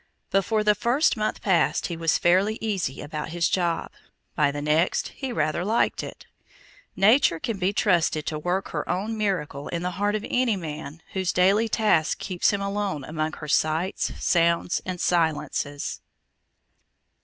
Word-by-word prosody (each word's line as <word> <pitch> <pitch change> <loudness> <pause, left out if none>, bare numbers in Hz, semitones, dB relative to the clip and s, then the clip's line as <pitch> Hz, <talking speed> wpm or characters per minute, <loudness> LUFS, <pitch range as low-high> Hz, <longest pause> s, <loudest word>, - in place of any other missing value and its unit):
Before 210 +2 +2
the 210 0 +5
first 240 +10 +2
month 215 -1 -2
passed, 190 -4 +2
he 170 - -3
was 165 -1 +1
fairly 190 +5 +3
easy 195 -11 -2
about 150 0 -5
his 170 +1 +1
job; 170 -3 -1 0.4
by 150 -2 +3
the 145 +1 -4
next 155 +4 +1
he 270 -2 -6
rather 170 -7 0
liked 220 +5 +1
it. - - -9 0.7
Nature 200 - +4
can 215 +3 -3
be 185 +1 +1
trusted 170 -7 +1
to 155 - -3
work 180 +5 -1
her - - -4
own 210 +5 -1
miracle 180 -9 -2
in 170 0 -3
the 180 - -1
heart 205 +1 +2
of 215 +1 -3
any 250 -3 +1
man 155 -3 -7
whose 190 -2 0
daily 200 +5 +3
task 210 -9 +2
keeps 185 -3 0
him 200 -1 -1
alone 200 -7 -2
among 155 +1 -3
her 150 - -8
sights, 155 +5 0
sounds, 170 0 +2
and 180 -1 -3
silences. 155 -4 -1
180 Hz, 160 wpm, -25 LUFS, 160-205 Hz, 0.7 s, the